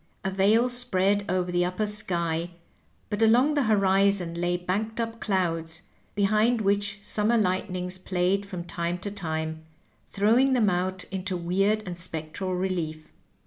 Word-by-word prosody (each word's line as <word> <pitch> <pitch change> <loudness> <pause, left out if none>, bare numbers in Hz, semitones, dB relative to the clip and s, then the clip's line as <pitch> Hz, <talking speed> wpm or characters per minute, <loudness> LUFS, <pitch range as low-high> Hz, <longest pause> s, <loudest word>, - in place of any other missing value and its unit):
A 190 - -1
veil 210 +5 +3
spread 205 -5 +1
over 180 0 0
the 175 0 +2
upper 180 +4 -1
sky, 170 -5 0 0.6
but 205 +1 -2
along 245 +7 +5
the 290 -3 +1
horizon 195 -3 +2
lay 175 +1 0
banked 205 +6 -3
up 230 0 -3
clouds, 165 -4 -1 0.3
behind 215 +4 +2
which 205 0 0
summer 215 +3 +1
lightnings 185 -2 -1
played 185 +2 0
from 185 -3 -6
time 170 0 -3
to 200 +3 -5
time, 160 -4 -4 0.5
throw 215 +4 +3
ing 265 0 +3
them 220 -6 +3
out 180 +1 -1
into 190 -1 -3
weird 195 +5 +1
and 175 -2 -6
spectral 170 +2 -4
relief. 170 -4 -3
190 Hz, 145 wpm, -26 LUFS, 175-210 Hz, 0.6 s, along